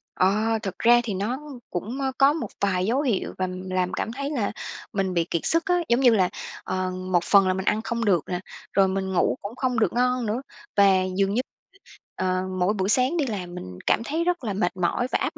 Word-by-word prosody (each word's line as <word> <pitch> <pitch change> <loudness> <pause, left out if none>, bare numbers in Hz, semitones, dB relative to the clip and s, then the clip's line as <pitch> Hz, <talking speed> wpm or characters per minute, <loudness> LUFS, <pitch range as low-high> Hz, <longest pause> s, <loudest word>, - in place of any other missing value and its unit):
Ờ, 215 +4 +2
thực 195 -3 -5
ra 240 +1 +6
thì 220 - -3
nó 210 +7 -2 0.3
cũng 225 +9 -4 0.2
có 275 +1 +6
một 320 - -3
vài 185 -2 +1
dấu 255 +6 +1
hiệu 240 -9 -1
và 185 - 0 0.2
làm 185 -1 0
cảm - - -2
thấy 280 +4 -4
là 230 -8 -1 0.4
mình 195 -2 0
bị 170 -1 +2
kiệt 170 - -1
sức 330 +2 +2
á. 360 - +2
Giống 235 +2 +4
như 255 -2 +6
là, 185 -3 +3 0.3
ờ, 185 0 -2
một 185 -1 0
phần 195 -2 +5
là 185 - +3
mình 190 +1 -3
ăn 215 +1 +2
không 235 0 -2
được 180 -7 +3
nè, 180 -1 -2 0.3
rồi 195 -1 +4
mình 190 0 -2
ngủ 185 - +2
cũng 205 +4 -6
không 250 -3 0
được - - +2
ngon 250 0 +1
nữa 220 +4 -1 0.4
và 200 - +7 0.3
dường 195 0 +2
như, 240 - +2 0.7
ờ, 185 0 0 0.2
mỗi 185 +4 +2
buổi 190 -1 -1
sáng 260 +9 +2
đi 295 - +1
làm 180 -6 -5
mình 90 - -8
cảm - - +3
thấy 320 +5 -1
rất 350 -5 0
là 210 - -2
mệt 190 -2 -1
mỏi 185 +8 0
và - - +3
áp - - -2
200 Hz, 230 wpm, -25 LUFS, 185-245 Hz, 0.7 s, và